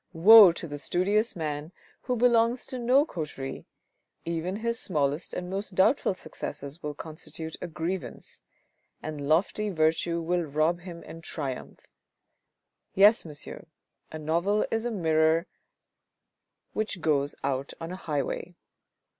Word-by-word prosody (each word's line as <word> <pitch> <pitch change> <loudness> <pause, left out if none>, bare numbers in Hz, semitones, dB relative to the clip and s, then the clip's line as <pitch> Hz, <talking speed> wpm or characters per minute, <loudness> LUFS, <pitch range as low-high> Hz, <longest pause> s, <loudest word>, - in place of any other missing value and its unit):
Woe 200 +3 +9
to 170 - -6
the 145 -1 -6
studious 205 +9 +1
man 155 -1 -4 0.3
who 250 - -1
belongs 235 0 +3
to 255 - -6
no 255 +5 +4
coterie, 150 - -6 0.6
even 170 +3 -2
his 235 +2 -2
smallest 145 -2 -1
and 180 - -4
most 195 +1 -4
doubtful 195 +1 +3
successes 150 -2 -7
will 150 -1 -5
constitute 160 +1 -7
a - - -4
grievance, 170 +3 -5 0.6
and 150 -2 -5
lofty 200 +6 +2
virtue 165 0 +1
will 175 +2 0
rob 155 +2 0
him 175 -1 -9
and 165 0 -10
triumph. 140 -6 -5 1.1
Yes, 205 +2 +6
monsieur, 155 +3 -9 0.4
a 155 - -5
novel 170 +7 +1
is 225 +1 -1
a 240 - -1
mirror 160 -3 +2 1.3
which 215 -3 -2
goes 145 -3 +1
out 135 0 -2
on 165 +1 -6
a - - -4
highway. 165 +1 -3
170 Hz, 130 wpm, -28 LUFS, 155-200 Hz, 1.3 s, Woe